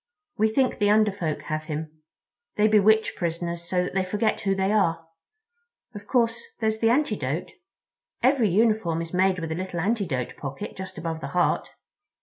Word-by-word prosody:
We 220 +1 +2
think 260 +3 +1
the 205 -1 +3
Under 215 0 +4
Folk 170 -6 -3
have 155 -1 -3
him. 155 0 -6 0.5
They 210 0 +4
bewitch 220 +1 +4
prisoners 170 0 -3
so 180 0 +1
that 180 - -5
they 190 0 +1
forget 210 +4 0
who 195 -1 +1
they 190 +1 +1
are. 165 -6 +1 0.9
Of 205 -1 -10
course, 235 -2 +1 0.2
there's 220 -1 0
the 225 - +3
antidote. 210 - 0 0.7
Every 255 -4 +4
uniform 195 -5 +2
is 165 - -10
made 185 +1 +3
with 165 -2 -4
a - - -1
little 185 0 -4
antidote 175 - -1
pocket 135 -1 -6
just 190 0 -7
over 165 -1 -4
the - - -4
heart." 175 - +1
190 Hz, 170 wpm, -25 LUFS, 165-220 Hz, 0.9 s, Under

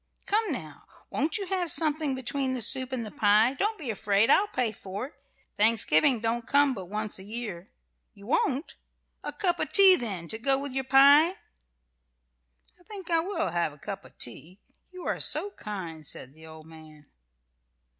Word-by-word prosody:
"Come, 430 -2 0
now, 155 - -8 0.2
won't 305 +9 0
you 400 - -5
have 365 -2 -2
something 305 -3 +2
between 260 +1 -2
the 250 - -3
soup 260 +2 +3
and 245 -3 -4
the 210 - -9
pie? 215 +4 +3
Don't 420 +10 -2
be 275 - -5
afraid: 205 0 +1
I'll 410 - +3
pay 250 - -2
for 200 +2 -7
it. 280 - -13 0.4
Thanksgiving 220 - +2
don't 230 +1 -3
come 285 -1 +3
but 190 -6 -8
once 210 -1 -5
a - - -10
year. 205 -4 -6 0.5
You 200 - -15
won't? 270 +5 -1 0.5
A - - -5
cup 360 -4 -2
of - - -1
tea, 390 -2 +9
then, 195 - -4
to 220 - -4
go 270 +3 +3
with 280 0 -1
your 265 0 -3
pie?" 280 +4 +6 1.5
"I - - -23
think 390 -5 -8
I 330 - +3
will 340 - -2
have 170 -3 -2
a - - -16
cup 195 +6 -8
of - - -19
tea; 165 +10 -5 0.3
you 365 -1 -11
are - - -2
so 405 - +2
kind," 185 - -8
said 135 -2 -4
the 160 +1 -13
old 160 -1 -12
man. 155 -2 -15
240 Hz, 185 wpm, -26 LUFS, 195-300 Hz, 1.5 s, tea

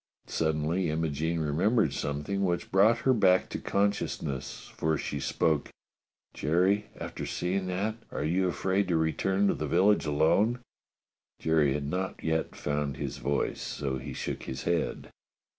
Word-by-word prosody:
Suddenly 80 +3 0
Imogene 80 +1 -1
remembered 80 - +2
something 75 +9 -2
which 85 -2 -1
brought 105 +5 +5
her 130 - +5
back 95 -5 +4
to - - -4
consciousness, 100 -9 -2
for 80 -1 +1
she 70 - -3
spoke: 75 +2 0 0.6
"Jerry, 95 +7 +2
after - - -5
seeing 95 +1 -1
that, 100 +5 -1
are - - -3
you 90 +4 +1
afraid 95 +2 0
to 85 -3 +2
return 95 +5 +1
to - - +3
the 75 - -3
village 95 +3 +3
alone. 80 +10 +3
f^" - - -13 0.8
Jerry 80 -4 +3
had 75 0 -2
not 95 +6 -3
yet 80 0 -1
found 75 -1 -2
his - - -4
voice, 70 0 -1
so 65 -2 -3
he - - -7
shook - - -4
his 65 0 -6
head. 85 -1 -1
85 Hz, 150 wpm, -29 LUFS, 75-95 Hz, 0.8 s, brought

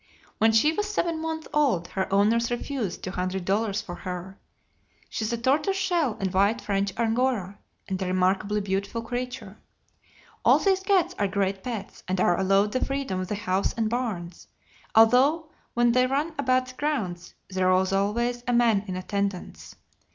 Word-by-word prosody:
When 225 0 +5
she 260 +8 +4
was 415 +4 -2
seven 335 -6 -1
months 320 0 -4
old 250 - +2
her 190 -1 -3
owners 220 +4 +3
refused 240 -4 -3
two 185 - -4
hundred 185 0 -3
dollars 205 +2 0
for 175 - -7
her. 185 +1 -7 0.7
She - - -3
is 215 - -2
a 235 - -1
tortoise 285 - +1
shell 345 - 0
and 190 -1 -2
white 200 +5 +3
French 200 -2 -1
Angora, 225 -4 0 0.3
and 190 -1 -3
a 190 - -1
remarkably 190 +3 +1
beautiful 200 +3 -2
creature. 245 -4 -5 0.8
All - - +6
these 385 -1 +2
cats 385 -3 +2
are 205 - +2
great 195 0 -1
pets, 220 -4 -6
and 185 0 -1
are 175 0 +3
allowed 195 +2 +3
the 255 - 0
freedom 275 -9 -2
of 185 - -3
the 210 - -2
house 195 -2 -1
and 225 -1 -1
barns, 195 -9 -4 0.5
although 265 +9 +5 0.2
when 240 0 +4
they 255 +1 +3
run 290 +5 -1
about 255 -2 +1
the - - -10
grounds 200 - -3 0.2
there 185 0 +2
is 185 +1 +2
always 235 +5 0
a 245 - +1
man 230 -4 +3
in 185 - -4
attendance. 185 - -4
215 Hz, 175 wpm, -26 LUFS, 190-255 Hz, 0.8 s, All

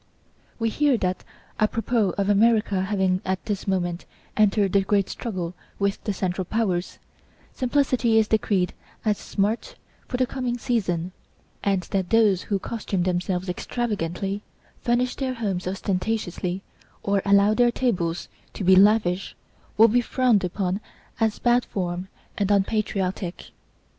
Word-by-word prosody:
We 230 -1 0
hear 285 +1 +2
that, 185 -3 -2 0.4
apropos 220 -2 +1
of 200 -1 +1
America 210 -1 +3
having 190 -2 +1
at 190 0 -2
this 205 -2 -3
moment 175 -2 -1 0.3
entered 205 -2 +3
the 200 - +5
great 200 0 +1
struggle 185 -7 -4 0.2
with 200 0 -1
the 210 - 0
Central 185 -1 -2
Powers, 185 -3 -1 0.6
simplicity 255 -3 +2
is 220 -1 +4
decreed 200 -4 +1 0.3
as 210 -2 +1
smart 220 - -1 0.3
for 250 - -2
the 255 - +3
coming 250 -1 -3
season, 185 -8 -1 0.5
and 195 -2 +2
that 190 -2 0
those 215 -5 +4
who 200 - -1
costume 195 -3 -2
themselves 180 +1 -1
extravagantly, 195 -1 -2 0.4
furnish 245 +1 +1
their 260 -2 -2
homes 195 -6 -2
ostentatiously 190 -1 -2 0.4
or 200 -1 +1
allow 200 +1 +5
their 240 +2 +4
tables 180 -10 -1 0.3
to - - -4
be 190 +1 +6
lavish, 195 -2 +3 0.4
will 225 +2 +8
be 240 +2 +3
frowned 240 -4 +2
upon 185 +2 -1 0.4
as 220 -2 +1
bad 240 0 +3
form 180 -1 -3 0.3
and 200 -1 +1
unpatriotic. 195 -3 -1
200 Hz, 135 wpm, -24 LUFS, 185-225 Hz, 0.6 s, will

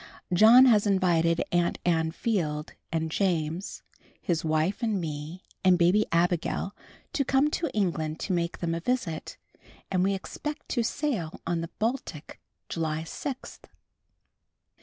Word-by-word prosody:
_ - - 0
John 230 +7 +8
has 215 -4 +5
invited 170 -4 +2
Aunt 175 -1 +1
Ann 160 -2 +2
Field, 160 -7 -2 0.2
and 160 -1 -1
James, 175 0 -1 0.4
his 170 -3 -1
wife 160 +7 0
and 220 -4 0
me 155 +2 -5 0.2
and 185 -1 +5
Babe 180 +5 +3
Abigail 175 +3 0 0.4
to 280 - +1
come 275 +3 +2
to 335 - -1
England 165 -6 -1
to 190 - -1
make 170 -1 -1
them 170 -1 -2
a 165 - -1
visit, 185 -6 -2 0.5
and 185 -1 +2
we 195 +1 +2
expect 300 +10 -6
to 240 - +1
sail 225 - -2
on 170 0 -1
the 165 - -5
Baltic 220 - -3 0.3
July 160 -1 -2
sixth. 260 - -7
175 Hz, 140 wpm, -27 LUFS, 165-215 Hz, 0.5 s, John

